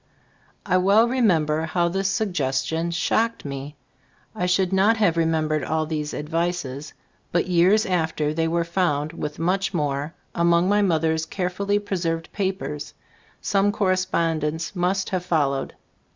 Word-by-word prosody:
I 185 -2 +2
well 200 +5 +4
remember 165 -11 +2
how 170 +1 +1
this 195 +3 -1
suggestion 165 -6 -1
shocked 220 +7 0
me. 140 +1 -6 0.6
I 180 - -1
should 185 +1 +1
not 205 +4 +4
have 200 -7 +2
remembered 160 -2 +1
all 155 +3 0
these 150 -1 -3
advices, 155 -3 -3 0.4
but 175 - +1
years 185 +4 +3
after 160 -4 0
they 165 +1 0
were 170 +1 +1
found 165 -3 -1
with 150 -2 -5
much 185 +3 0
more 145 0 -2 0.2
among 170 +1 +3
my 205 +1 +3
mother's 160 -3 +1
care 180 0 -2
fully 200 +2 0
preserved 170 -5 -3
papers; 190 -7 -3 0.5
some 200 0 +2
corre 200 -3 +1
spondence 165 -2 -1
must 185 +2 0
have 185 -2 -1
followed. 145 -6 0
170 Hz, 140 wpm, -23 LUFS, 155-190 Hz, 0.6 s, well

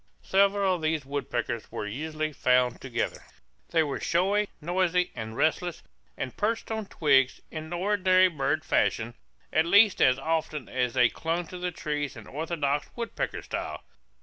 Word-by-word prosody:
Several 195 0 +3
of 175 - -3
these 155 -2 0
woodpeckers 125 -4 -3
were - - -4
usually 155 +7 -3
found 125 -2 +2
together. 130 -3 -3 0.5
They 165 -1 +3
were 145 -3 -3
showy, 200 +4 +1
noisy, 180 +2 +1
and 110 0 -6
restless, 170 +2 0 0.3
and 130 - -4
perched 225 +2 -1
on 220 -2 -3
twigs, 135 -7 +3
in 160 0 -6
ordinary 185 0 +4
bird 150 -7 -1
fashion, - - +1 0.4
at 160 +1 +3
least 205 +2 +5
as 130 0 +5
often 160 -3 -2
as 125 -2 -1
they 125 -2 +5
clung 170 +2 -2
to 180 - -7
the 180 0 -1
trunks 150 -3 -3
in - - -10
orthodox 150 -1 -2
woodpecker 235 -1 -3
style. - - -5
160 Hz, 150 wpm, -28 LUFS, 140-185 Hz, 0.5 s, least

